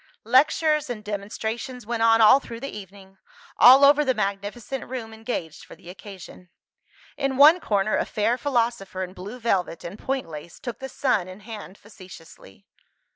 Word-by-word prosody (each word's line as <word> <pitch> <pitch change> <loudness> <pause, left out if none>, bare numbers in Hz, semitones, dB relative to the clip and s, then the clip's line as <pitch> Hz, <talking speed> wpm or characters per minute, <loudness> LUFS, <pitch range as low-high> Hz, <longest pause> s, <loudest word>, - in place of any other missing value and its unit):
Lectures 300 +4 +2
and 220 -3 -6
demonstrations 220 +4 -5
went 235 0 -3
on 225 0 +4
all 240 +5 +7
through 230 -4 -9
the 275 - -6
evening, 195 -1 -13 0.4
all 265 +3 +8
over 290 +1 +5
the 260 -3 0
magnificent 210 +5 -4
room 235 -4 -6
engaged 220 -8 -6
for - - -13
the 175 - -12
occasion. 190 -2 -13 0.7
In 275 -2 -2
one 305 +5 +7
corner, 210 - 0
a - - 0
fair 220 +3 0
philosopher 235 -8 -2
in 185 0 -8
blue 200 +6 -9
velvet 190 -7 -1
and 190 +5 -8
point 265 -8 -3
lace, 160 +1 -10
took 240 -3 -7
the 265 - -7
Sun 240 -9 0
in 185 +3 -11
hand 210 -2 -10
facetiously. 175 - -15
220 Hz, 165 wpm, -24 LUFS, 195-255 Hz, 0.7 s, all